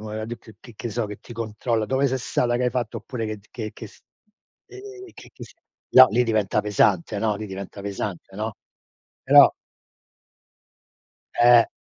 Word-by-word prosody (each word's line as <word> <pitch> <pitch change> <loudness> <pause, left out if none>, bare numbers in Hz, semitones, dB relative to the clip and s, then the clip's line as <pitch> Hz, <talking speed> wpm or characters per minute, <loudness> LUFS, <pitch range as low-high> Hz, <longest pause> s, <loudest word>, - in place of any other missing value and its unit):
mua 110 0 -5
di 115 +2 -5
d 110 -2 -16
che 120 - -14
che 120 - -6
so, 115 +2 -2
che 105 -1 -8
ti 120 - -12
controlla: 110 0 -2
"Dove 135 +5 +1
sei 130 0 0
stata, 120 -1 -1
che 125 - -1
hai 125 - +1
fatto?" 120 -3 -3
Oppure 120 -4 -5
che 110 0 -4
d 100 0 -20
che 110 -2 -6
che - - -9
s - - -19 0.7
ehm, 390 -1 -11
che - - -14
che - - -11
s - - -16 0.4
no, 130 0 +9
lì 120 +4 +2
diventa 110 -4 0
pesante. 105 -1 +1
No, 105 -1 0
lì 110 - -6
diventa 100 +1 -8
pesante, 100 -2 -6
no? 110 +2 -4 0.7
Però - - +7 1.8
Eh. 120 -1 +6
110 Hz, 185 wpm, -23 LUFS, 105-120 Hz, 1.8 s, no